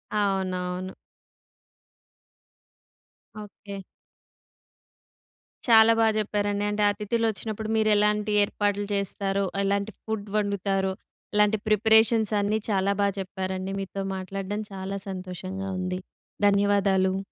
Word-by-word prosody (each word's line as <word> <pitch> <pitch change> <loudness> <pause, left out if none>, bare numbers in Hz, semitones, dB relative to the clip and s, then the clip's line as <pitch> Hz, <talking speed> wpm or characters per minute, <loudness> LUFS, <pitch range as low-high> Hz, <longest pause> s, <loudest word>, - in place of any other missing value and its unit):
అవునవును. 185 -2 -1 2.5
ఓకే. 200 -1 -10 1.9
చాలా 225 -1 +7
బా 225 - +5
జెప్పారండి. 205 -1 -1
అంటే 210 0 0
అతిథులు 210 +3 -1
వచ్చినప్పుడు 215 0 -5
మీరు 215 0 +2
ఎలాంటి 210 0 +1
ఏర్పాట్లు 205 0 -1
జేస్తారో, 200 0 0 0.2
ఎలాంటి 200 +2 0
ఫుడ్ 220 -2 -4
వండుతారో? 195 -2 0 0.4
ఇలాంటి 210 +1 +4
ప్రిపరేషన్స్ 220 +1 +4
అన్నీ 210 +2 0
చాలా 195 -1 +2
బా 200 - +4
చెప్పారండి. 190 0 -4
మీతో 195 0 -4
మాట్లాడడం 195 +2 -4
చాలా 195 +1 -4
సంతోషంగా 185 +1 -5
ఉంది. 185 0 -2 0.5
ధన్యవాదాలు. 200 -2 +2
200 Hz, 95 wpm, -26 LUFS, 190-210 Hz, 2.5 s, చాలా